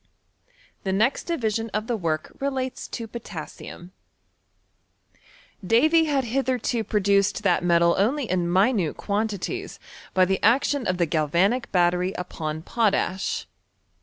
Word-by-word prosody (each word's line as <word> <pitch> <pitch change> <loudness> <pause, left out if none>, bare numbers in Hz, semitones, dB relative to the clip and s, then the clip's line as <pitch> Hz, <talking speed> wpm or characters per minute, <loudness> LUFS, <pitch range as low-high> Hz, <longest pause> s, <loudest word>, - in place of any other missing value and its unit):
The 190 - -1
next 220 +8 +1
division 225 -9 -1
of 215 0 -1
tlie 230 -2 -2
work 155 -3 -2
relates 265 -2 -3
to 230 - -5
potassium* 180 -4 -9 1.7
Davy 310 - +4
had 285 -3 +1
hitherto 250 -1 -1
produced 200 -1 +1
that 195 - +2
metal 170 -1 +4
only 255 +6 +1
in 175 -2 0
mi 195 +8 +4
nute 180 -9 -1
quantities 215 - -3 0.4
by 185 -1 +5
the 190 +1 -1
action 265 +3 +2
of 185 - 0
the 175 - +2
galvanic 170 - +1
battery 180 0 +2
upon 160 -3 -5
potash. 200 -3 0
205 Hz, 125 wpm, -24 LUFS, 180-245 Hz, 1.7 s, by